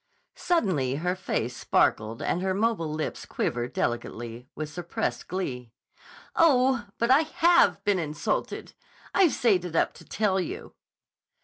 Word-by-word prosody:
Suddenly 175 - +1
her 180 +5 -1
face 125 -10 -2
sparkled 110 -1 +1
and 180 - 0
her 190 0 0
mobile 200 -7 0
lips 155 0 -3
quivered 120 0 -2
delicately 120 0 -3
with 155 - -4
suppressed 175 0 -3
glee. 130 -10 -4 0.7
"Oh, 260 -7 +4
but 235 +2 +2
I 270 - +7
have 340 +2 +3
been 200 -3 +2
insulted. 150 -2 -3 0.4
I've 375 -5 +4
saved 210 -8 +2
it 175 -2 -6
up - - +2
to - - -14
tell 200 -2 0
you." 180 - -5
180 Hz, 135 wpm, -27 LUFS, -, 0.7 s, I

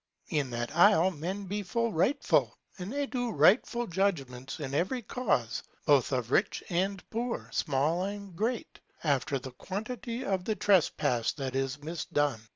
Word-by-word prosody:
In 145 -5 0
that 120 +4 -4
isle 185 0 +6
men 185 +5 -4
be 205 +3 -2
full 230 +4 -1
rightfull 185 - +2 0.3
and 185 +3 -5
they 285 +1 -1
do 245 -3 -2
rightfull 220 - +4
judgments 140 -10 -1
in 140 -3 -4
every 190 - 0
cause 200 - 0 0.2
both 140 -3 +4
of 125 -2 -1
rich 195 - +2
and 190 +2 -1
poor, 235 +2 -2
small 150 +6 +1
and 200 -2 -6
great, 225 +5 -2 0.2
after 140 -2 +1
the 130 0 -8
quantity 230 - -5
of 190 -2 0
the 220 - 0
trespass 150 - +2
that 135 -3 -4
is 135 +2 -2
mis 165 +1 -4
done. 145 -6 0
175 Hz, 160 wpm, -30 LUFS, 140-210 Hz, 0.3 s, isle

